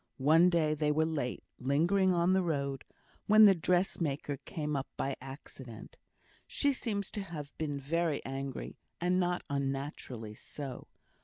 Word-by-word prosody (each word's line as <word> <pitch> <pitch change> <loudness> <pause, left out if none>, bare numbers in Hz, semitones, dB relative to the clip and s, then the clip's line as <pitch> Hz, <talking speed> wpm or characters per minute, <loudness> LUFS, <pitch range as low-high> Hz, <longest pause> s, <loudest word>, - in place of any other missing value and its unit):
One 160 +6 +6
day 160 -3 +2
they 150 0 +1
were 155 +1 +2
late, 145 -6 -2 0.2
lingering 170 +9 +3
on 175 +1 +3
the 190 - +4
road, 140 -6 -2 0.4
when 215 +1 +8
the 200 - +8
dressmaker 165 -5 0
came 150 -2 -3
up 135 -1 -2
by 135 0 -1
accident. 130 -3 -10 0.5
She 285 -1 +2
seems 205 -6 -3
to 205 - -3
have 155 -7 -7
been 145 -3 -2
very 160 +2 -1
angry, 135 0 -5 0.2
and 180 +1 +2
not 180 -1 0
unnaturally 135 -5 -3
so. 135 +3 -8
150 Hz, 145 wpm, -32 LUFS, 140-175 Hz, 0.5 s, when